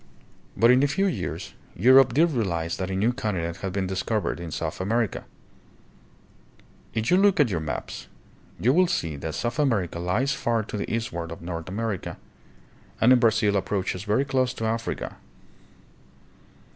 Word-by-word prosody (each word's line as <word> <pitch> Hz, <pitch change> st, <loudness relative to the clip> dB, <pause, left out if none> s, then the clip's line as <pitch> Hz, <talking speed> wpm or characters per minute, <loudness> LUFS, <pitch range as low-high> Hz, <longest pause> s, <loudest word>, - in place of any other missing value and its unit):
But 115 Hz, +2 st, +6 dB
in 125 Hz, +1 st, +5 dB
a 145 Hz, -, +4 dB
few 195 Hz, +8 st, 0 dB
years 190 Hz, -, -3 dB, 0.2 s
Europe 130 Hz, +4 st, +6 dB
did 165 Hz, +3 st, +4 dB
realize 85 Hz, -, -1 dB
that 95 Hz, 0 st, -3 dB
a 95 Hz, -, -2 dB
new 110 Hz, +6 st, +2 dB
continent 95 Hz, -9 st, -3 dB
had 95 Hz, -, -4 dB
been 95 Hz, 0 st, -1 dB
discovered 95 Hz, +1 st, -2 dB
in 85 Hz, -1 st, -6 dB
South 80 Hz, +2 st, -4 dB
America. 110 Hz, +2 st, -1 dB, 1.7 s
If 110 Hz, +5 st, 0 dB
you 180 Hz, -, +6 dB
will 195 Hz, -, +4 dB
look 200 Hz, -4 st, +3 dB
at 135 Hz, -7 st, +4 dB
your 85 Hz, -, 0 dB
maps, 80 Hz, -1 st, -5 dB, 0.5 s
you 125 Hz, +4 st, +3 dB
will 180 Hz, +3 st, +4 dB
see 80 Hz, -, -2 dB
that 80 Hz, +2 st, -5 dB
South 120 Hz, +5 st, -2 dB
America 105 Hz, -, +1 dB
lies 105 Hz, +11 st, 0 dB
far 115 Hz, -4 st, 0 dB
to 105 Hz, -, -7 dB
the 100 Hz, -, -4 dB
eastward 85 Hz, -8 st, -3 dB
of 85 Hz, -, -9 dB
North 85 Hz, -1 st, -5 dB
America 105 Hz, -1 st, -3 dB, 0.8 s
and 125 Hz, +3 st, +6 dB
in 125 Hz, -, +5 dB
Brazil 110 Hz, -3 st, +3 dB
approaches 95 Hz, -1 st, -1 dB
very 105 Hz, +6 st, +1 dB
close 130 Hz, -2 st, 0 dB
to 110 Hz, -, -3 dB
Africa. 115 Hz, 0 st, -3 dB
110 Hz, 170 wpm, -25 LUFS, 90-125 Hz, 1.7 s, But